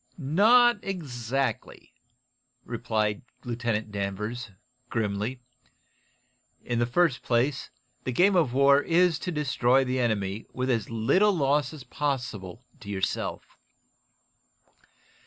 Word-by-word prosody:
"Not 210 Hz, -, +4 dB
exactly," 135 Hz, -, -4 dB, 0.7 s
replied 110 Hz, -3 st, -1 dB, 0.2 s
Lieutenant 115 Hz, -3 st, -2 dB
Danvers, 105 Hz, +4 st, -4 dB, 0.4 s
grimly. 110 Hz, +3 st, -2 dB, 1.2 s
"In 120 Hz, -1 st, -1 dB
the 120 Hz, -, +1 dB
first 135 Hz, 0 st, +2 dB
place, 125 Hz, +3 st, 0 dB, 0.3 s
the 125 Hz, -, -2 dB
game 185 Hz, +10 st, +4 dB
of 160 Hz, -8 st, +3 dB
war 140 Hz, +2 st, +5 dB
is 170 Hz, 0 st, +2 dB
to 180 Hz, -, -4 dB
destroy 135 Hz, -4 st, +2 dB
the 130 Hz, 0 st, -1 dB
enemy 105 Hz, -3 st, -1 dB
with 130 Hz, +1 st, -1 dB
as 115 Hz, -4 st, -1 dB
little 135 Hz, -, +3 dB
loss 145 Hz, -4 st, +1 dB
as 155 Hz, -4 st, -10 dB
possible 125 Hz, -6 st, -4 dB, 0.2 s
to 100 Hz, -, -11 dB
yourself. 95 Hz, -2 st, -3 dB
125 Hz, 105 wpm, -27 LUFS, 110-145 Hz, 1.2 s, war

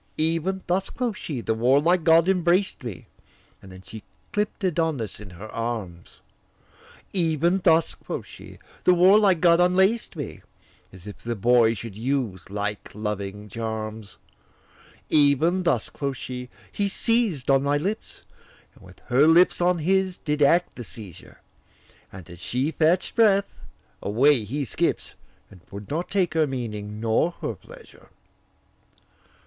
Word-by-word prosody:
'Even 165 Hz, +4 st, 0 dB
thus,' 185 Hz, +2 st, -1 dB
quoth 240 Hz, -3 st, -3 dB
she, 145 Hz, -, -5 dB
'the 110 Hz, -, -1 dB
warlike 140 Hz, +10 st, +3 dB
god 165 Hz, +1 st, +5 dB
embraced 180 Hz, -2 st, +1 dB
me,' 115 Hz, -7 st, -7 dB, 0.6 s
And 95 Hz, -, -13 dB
then 95 Hz, 0 st, -13 dB
she 110 Hz, +2 st, -10 dB, 0.3 s
clipp'd 210 Hz, 0 st, -2 dB
Adonis 160 Hz, -, -1 dB
in 105 Hz, -2 st, -10 dB
her 90 Hz, +4 st, -10 dB
arms; 110 Hz, -7 st, -6 dB, 0.9 s
'Even 170 Hz, 0 st, +1 dB
thus,' 165 Hz, -2 st, +3 dB
quoth -, -, -7 dB
she, -, -, -13 dB, 0.3 s
'the 180 Hz, -, +5 dB
warlike 190 Hz, 0 st, +5 dB
god 170 Hz, -1 st, +5 dB
unlaced 190 Hz, +5 st, +2 dB
me,' -, -, -7 dB, 0.5 s
As 95 Hz, 0 st, -14 dB
if 105 Hz, -, -9 dB
the 120 Hz, 0 st, -4 dB
boy 115 Hz, +1 st, +3 dB
should 115 Hz, -2 st, -8 dB
use 115 Hz, -6 st, -3 dB
like 105 Hz, +1 st, -4 dB
loving 105 Hz, -1 st, -5 dB
charms; 110 Hz, -1 st, -6 dB, 0.9 s
'Even 155 Hz, +5 st, +3 dB
thus,' 165 Hz, -11 st, 0 dB
quoth 140 Hz, -2 st, -4 dB
she, 125 Hz, -1 st, -7 dB, 0.2 s
'he 205 Hz, -, -1 dB
seized 205 Hz, -, 0 dB
on 135 Hz, 0 st, +4 dB
my 140 Hz, +1 st, +1 dB
lips 200 Hz, +9 st, -4 dB, 0.5 s
And -, -, -20 dB
with -, -, -15 dB
her 135 Hz, +5 st, +4 dB
lips 175 Hz, +2 st, +5 dB
on 180 Hz, 0 st, +3 dB
his 185 Hz, +3 st, 0 dB
did 150 Hz, -1 st, -3 dB
act 170 Hz, +5 st, +3 dB
the 120 Hz, -, -6 dB
seizure 105 Hz, -5 st, -11 dB, 0.7 s
And 95 Hz, -4 st, -11 dB
as 85 Hz, -1 st, -12 dB
she 130 Hz, -, -2 dB
fetched 165 Hz, +3 st, +1 dB
breath, 200 Hz, -4 st, +3 dB, 0.5 s
away 120 Hz, +3 st, +3 dB
he 140 Hz, +7 st, -3 dB
skips, -, -, -1 dB, 0.4 s
And 90 Hz, -, -16 dB
would 100 Hz, +5 st, -9 dB
not 165 Hz, +4 st, -2 dB
take 185 Hz, -5 st, 0 dB
her 160 Hz, -2 st, +2 dB
meaning 105 Hz, -5 st, -5 dB
nor 115 Hz, +10 st, +1 dB
her -, -, -2 dB
pleasure. -, -, -16 dB
145 Hz, 145 wpm, -24 LUFS, 110-180 Hz, 0.9 s, god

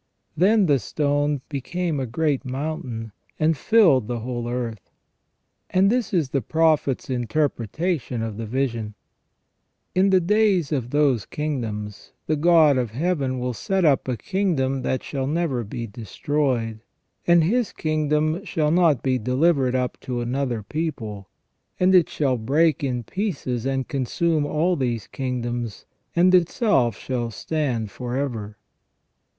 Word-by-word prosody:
Then 200 Hz, +4 st, +4 dB
the 145 Hz, -5 st, +3 dB
stone 145 Hz, +3 st, 0 dB
" -, -, -44 dB
became 155 Hz, +3 st, -2 dB
a 130 Hz, -, -2 dB
great 145 Hz, +3 st, 0 dB
mountain, 130 Hz, -5 st, -4 dB, 0.3 s
and 155 Hz, +1 st, +3 dB
filled 155 Hz, -, +4 dB
the 120 Hz, -1 st, -3 dB
whole 120 Hz, 0 st, -4 dB
earth 120 Hz, -4 st, -4 dB, 0.4 s
". -, -, -50 dB, 0.3 s
And 190 Hz, +2 st, +3 dB
this 240 Hz, -3 st, 0 dB
is 165 Hz, -9 st, +1 dB
the 135 Hz, -, +1 dB
Prophet's 155 Hz, 0 st, +1 dB
interpretation 130 Hz, -, -1 dB
of 110 Hz, -2 st, -4 dB
the 115 Hz, -1 st, -5 dB
vision: 115 Hz, -4 st, -2 dB, 0.5 s
" -, -, -50 dB
In 190 Hz, +2 st, +3 dB
the 190 Hz, -1 st, +5 dB
days 195 Hz, -4 st, +2 dB
of 130 Hz, -5 st, -1 dB
those 140 Hz, -6 st, +2 dB
kingdoms, 110 Hz, -9 st, -4 dB
the 155 Hz, -, +1 dB
God 155 Hz, -3 st, +5 dB
of 120 Hz, -3 st, -1 dB
Heaven 135 Hz, 0 st, -1 dB
will 125 Hz, 0 st, -2 dB
set 190 Hz, -, 0 dB
up 140 Hz, -4 st, +3 dB
a 125 Hz, -2 st, -1 dB
kingdom 150 Hz, -, 0 dB
that 130 Hz, -, -1 dB
shall 135 Hz, -2 st, -3 dB
never 150 Hz, -5 st, 0 dB
be 115 Hz, +3 st, -5 dB
destroyed, 115 Hz, +2 st, -2 dB, 0.5 s
and 170 Hz, -1 st, +6 dB
His 225 Hz, +6 st, +1 dB
kingdom 155 Hz, +2 st, 0 dB
shall 155 Hz, -6 st, 0 dB
not 165 Hz, -6 st, +3 dB
be 130 Hz, -1 st, +1 dB
delivered 130 Hz, +2 st, +2 dB
up 125 Hz, -1 st, -1 dB
to 125 Hz, -2 st, -4 dB
another 120 Hz, -2 st, -2 dB
people, 110 Hz, -9 st, -4 dB, 0.5 s
and 185 Hz, +1 st, +4 dB
it 180 Hz, -3 st, +5 dB
shall 135 Hz, -4 st, 0 dB
break 145 Hz, +7 st, +2 dB
in 125 Hz, -3 st, -1 dB
pieces 135 Hz, -, -3 dB
and 135 Hz, -1 st, -1 dB
consume 150 Hz, +3 st, 0 dB
all 165 Hz, +5 st, +1 dB
these 120 Hz, -, -2 dB
kingdoms, 120 Hz, -4 st, -4 dB, 0.3 s
and 180 Hz, +2 st, +4 dB
itself 175 Hz, -, +3 dB
shall 120 Hz, -3 st, -3 dB
stand 120 Hz, -3 st, -2 dB
for 125 Hz, +3 st, -4 dB
ever". 110 Hz, -7 st, -3 dB
135 Hz, 145 wpm, -23 LUFS, 120-160 Hz, 0.5 s, and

